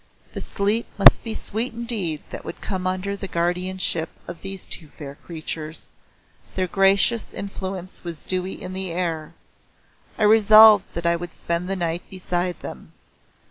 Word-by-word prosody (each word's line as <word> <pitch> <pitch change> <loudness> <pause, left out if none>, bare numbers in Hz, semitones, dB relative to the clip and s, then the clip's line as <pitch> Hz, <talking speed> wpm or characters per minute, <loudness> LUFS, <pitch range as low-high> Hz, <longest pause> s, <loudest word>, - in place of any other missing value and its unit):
The - - -5
sleep 210 +4 -1
must 200 - +8
be 225 -2 -4
sweet 225 +4 -3
indeed 220 -10 -2
that - - -7
would - - -7
come 185 -2 -3
under 185 +2 -2
the 195 -1 -6
guardianship 175 -1 -1 0.2
of 175 -1 -8
these 195 -1 -6
two 160 - -8
fair 140 -2 -7
creatures 155 0 -7 0.7
their 185 - +1
gracious 195 +5 +3
influence 190 -2 -6
was 170 -3 -6
dewy 185 0 -3
in 185 0 -7
the 190 -1 -3
air. 165 -3 -3 0.8
I 220 - 0
resolved 215 -1 +8
that 170 0 -4
I 170 0 +4
would 175 0 -6
spend 170 +2 -2
the 195 - 0
night 170 -1 -1
beside 180 -1 -2
them. - - -9
185 Hz, 155 wpm, -23 LUFS, 170-200 Hz, 0.8 s, must